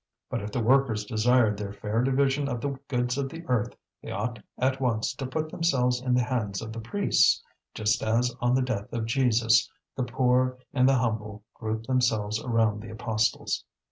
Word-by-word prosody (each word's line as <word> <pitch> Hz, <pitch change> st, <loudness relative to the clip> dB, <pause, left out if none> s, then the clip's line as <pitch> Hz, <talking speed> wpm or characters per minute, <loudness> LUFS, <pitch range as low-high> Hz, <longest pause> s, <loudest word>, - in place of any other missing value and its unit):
But -, -, -1 dB
if 105 Hz, +1 st, -6 dB
the 120 Hz, -, -1 dB
workers 120 Hz, -4 st, +3 dB
desired 110 Hz, 0 st, +3 dB
the 100 Hz, -1 st, -5 dB
fair 105 Hz, +2 st, -1 dB
division 135 Hz, +2 st, +1 dB
of 120 Hz, -3 st, -2 dB
the 140 Hz, -, -2 dB, 0.2 s
goods 125 Hz, 0 st, -1 dB
of 135 Hz, -1 st, -1 dB
the 165 Hz, +4 st, -9 dB
earth, 120 Hz, -2 st, 0 dB, 0.3 s
they -, -, -9 dB
ought 110 Hz, +4 st, -3 dB, 0.2 s
at 130 Hz, +1 st, 0 dB
once 115 Hz, -3 st, 0 dB
to 130 Hz, 0 st, -5 dB
put 155 Hz, +4 st, -3 dB
themselves 125 Hz, -7 st, +1 dB
in 125 Hz, -1 st, +1 dB
the 125 Hz, -, +3 dB
hands 110 Hz, -6 st, -2 dB
of 110 Hz, -1 st, -6 dB
the 115 Hz, -, -6 dB
priests, 200 Hz, -, +2 dB, 0.3 s
just 105 Hz, -1 st, +1 dB
as 120 Hz, +2 st, +1 dB
on 120 Hz, +1 st, +3 dB
the 130 Hz, -, +2 dB
death 110 Hz, -6 st, -3 dB
of 115 Hz, -1 st, -1 dB
Jesus 120 Hz, +2 st, +3 dB, 0.3 s
the 130 Hz, -, -1 dB
poor 125 Hz, 0 st, +1 dB, 0.2 s
and 130 Hz, -1 st, +4 dB
the 135 Hz, -, +4 dB
humble 105 Hz, -4 st, -2 dB
grouped 110 Hz, 0 st, -4 dB
themselves 110 Hz, -5 st, +1 dB
around 110 Hz, -4 st, +1 dB
the 115 Hz, -, -9 dB
apostles. 110 Hz, -1 st, -1 dB
120 Hz, 190 wpm, -27 LUFS, 110-130 Hz, 0.3 s, and